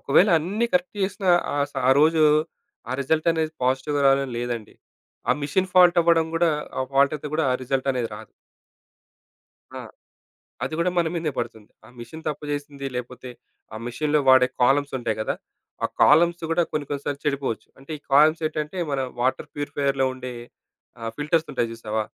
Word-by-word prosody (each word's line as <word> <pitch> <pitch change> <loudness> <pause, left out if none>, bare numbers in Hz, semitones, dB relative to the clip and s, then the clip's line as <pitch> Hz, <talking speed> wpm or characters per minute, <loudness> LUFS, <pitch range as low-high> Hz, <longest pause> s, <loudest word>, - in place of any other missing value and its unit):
ఒకవేళ 180 +9 +4
అన్నీ 200 +9 -1
కరెక్ట్ 180 +3 0
జేసినా 190 -1 0 0.2
ఆ - - -2 0.2
స - - -41
ఆ - - +7
రోజు 160 +1 +4 0.7
ఆ - - -1
రిజల్ట్ 155 +4 +1
అనేది 160 -1 -1
పాజిటివ్‌గా 135 +3 0
రావాలని 135 -2 +2
లేదండి. 120 -3 -4 0.6
ఆ - - +7
మాషీన్ 185 +6 0
ఫాల్ట్ 180 -1 +6
అవ్వడం 165 -1 +3
గూడా 165 0 +3 0.3
ఆ - - +1
ఫాల్ట్ 140 +2 +4
అయితే 150 +1 -7
గూడా 160 - +1
ఆ - - +1
రిజల్ట్ 135 +1 -1
అనేది 120 -3 -2
రాదు. 110 -1 -11 1.5
ఆ! - - -5 0.9
అది - - -5
గూడా 175 +2 +2
మన 165 -1 +2
మీదే 160 -2 -1
పడుతుంది. 115 -3 -5 0.2
ఆ - - -16
మెషీన్ 140 +8 -9
తప్పుచేసింది. 145 -1 -5
లేపోతే 125 +1 -7 0.5
ఆ - - -5
మెషీన్‌లో 150 +4 0
వాడే 130 -1 +7 0.2
కాలమ్స్ 140 +3 +3
ఉంటాయి 110 -3 -2
గదా! - - -1 0.5
ఆ - - +4 0.2
కాలమ్స్ 170 +2 +5
గూడా 170 +1 +3
కొన్ని 150 -2 -2
కొన్ని 140 -1 -4
సార్లు 145 -1 -3
చెడిపోవచ్చు. 140 -6 -2
అంటే 135 +3 -16
ఈ - - -31
కాలమ్స్ 155 +3 +5
ఏంటంటే 155 +3 -4
మన 140 - -1 0.2
వాటర్ 130 +1 0
ప్యూరిఫైయర్‌లో 140 -2 -1
ఉండే 125 -1 -7 0.7
ఆహ్, 115 0 -4
ఫిల్టర్స్ 155 +2 0
ఉంటాయి 115 - -1
జూసావా? 110 -1 -3
145 Hz, 170 wpm, -24 LUFS, 130-160 Hz, 1.5 s, ఆ